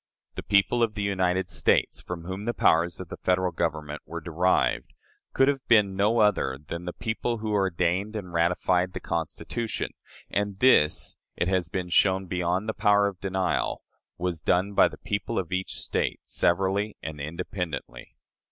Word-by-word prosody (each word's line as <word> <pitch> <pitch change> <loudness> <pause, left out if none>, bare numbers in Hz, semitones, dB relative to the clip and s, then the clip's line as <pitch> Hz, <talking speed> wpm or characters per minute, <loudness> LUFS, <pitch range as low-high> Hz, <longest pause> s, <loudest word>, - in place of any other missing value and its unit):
The - - -5
"people 100 +4 +2
of 110 -2 +1
the 105 - -2
United 95 -2 +1
States," - - +1
from 90 -2 -6
whom 95 +4 -5
the 120 - -1
powers 85 +1 +3
of 90 -3 -7
the - - -7
Federal 90 0 +2
Government 75 -3 -3
were 85 - -6
"derived," 85 +3 +1 0.4
could 135 - +3
have 140 -2 +1
been 105 -4 +4
no 105 +4 +2
other 100 -11 +2
than 85 +4 -7
the 90 - -4
people 115 +1 -2
who 110 0 -3
ordained 95 +1 0
and 90 -5 -6
ratified 90 +2 +1
the - - -4
Constitution; 85 +7 -3 0.4
and 100 -1 -2
this, 100 -10 +4 0.2
it 90 - 0
has 95 -3 0
been 90 0 -3
shown 95 +1 +3
beyond 90 +3 -1
the 110 - -1
power 105 -1 +3
of 100 -3 -3
denial, 95 -3 -1 0.3
was 90 -3 -3
done 95 +5 +1
by - - +6
the - - -9
people 100 +3 -3
of 90 -2 -2
each 95 +1 -2
State, - - -1
severally 95 +4 0
and 75 -2 -6
independently. 80 0 -5
95 Hz, 170 wpm, -26 LUFS, 85-100 Hz, 0.4 s, by